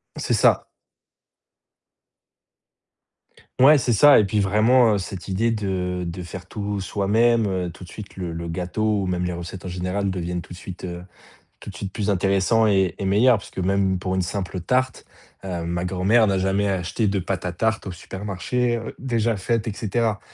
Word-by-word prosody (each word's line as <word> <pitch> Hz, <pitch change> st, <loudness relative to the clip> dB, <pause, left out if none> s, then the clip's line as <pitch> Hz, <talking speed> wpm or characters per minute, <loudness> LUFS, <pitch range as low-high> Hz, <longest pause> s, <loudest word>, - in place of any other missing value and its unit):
C'est -, -, -1 dB
ça. -, -, +3 dB, 2.9 s
Ouais, 145 Hz, +3 st, +7 dB
c'est 125 Hz, -, 0 dB
ça, 140 Hz, +6 st, +7 dB
et -, -, +4 dB
puis 105 Hz, +2 st, 0 dB
vraiment, 110 Hz, +4 st, +4 dB
heu, -, -, +2 dB
cette 95 Hz, -1 st, -7 dB
idée 105 Hz, +5 st, +1 dB
de 95 Hz, -4 st, -2 dB
de 85 Hz, +2 st, -5 dB
faire 90 Hz, +1 st, -8 dB
tout 105 Hz, 0 st, -4 dB
soi-même, 110 Hz, +4 st, +2 dB
heu, 90 Hz, -3 st, -2 dB
tout 95 Hz, -, -13 dB
de 90 Hz, -, -11 dB
suite, 105 Hz, -2 st, -10 dB
le 90 Hz, -3 st, -4 dB
le 85 Hz, +1 st, -5 dB
gâteau 100 Hz, +5 st, -1 dB
ou 95 Hz, -, -2 dB
même 90 Hz, -1 st, -1 dB
les 90 Hz, -, -2 dB
recettes 85 Hz, +2 st, -7 dB
en -, -, -4 dB
général 90 Hz, +2 st, -2 dB
deviennent 90 Hz, -1 st, -3 dB
tout -, -, -11 dB
de -, -, -10 dB
suite, 95 Hz, -1 st, -9 dB
heu, 90 Hz, -1 st, -6 dB, 0.6 s
tout -, -, -9 dB
de 95 Hz, -, -10 dB
suite 95 Hz, +1 st, -6 dB
plus 105 Hz, -1 st, -2 dB
intéressants 100 Hz, +3 st, +2 dB
et 95 Hz, -4 st, +2 dB
et 100 Hz, -, -4 dB
meilleures. 110 Hz, +5 st, +4 dB
Puisque 100 Hz, -, -9 dB
même 95 Hz, 0 st, +1 dB
pour 95 Hz, +1 st, -2 dB
une 95 Hz, -, +1 dB
simple 95 Hz, 0 st, -4 dB
tarte, 130 Hz, +6 st, 0 dB, 0.4 s
heu, 85 Hz, -3 st, -3 dB
ma 85 Hz, +1 st, -2 dB
grand-mère 95 Hz, +5 st, +3 dB
n'a 95 Hz, -2 st, +1 dB
jamais 95 Hz, +2 st, +1 dB
acheté 95 Hz, +3 st, -1 dB
de 100 Hz, 0 st, 0 dB
pâte 95 Hz, +1 st, -3 dB
à 90 Hz, -, -1 dB
tarte 110 Hz, +5 st, -1 dB
au 95 Hz, -, -4 dB
supermarché, 105 Hz, +7 st, -2 dB
heu, 115 Hz, -, -7 dB
déjà 115 Hz, -4 st, 0 dB
faite 115 Hz, +3 st, -1 dB
et 110 Hz, -, -2 dB
cetera. 110 Hz, 0 st, -1 dB
95 Hz, 190 wpm, -23 LUFS, 90-110 Hz, 2.9 s, Ouais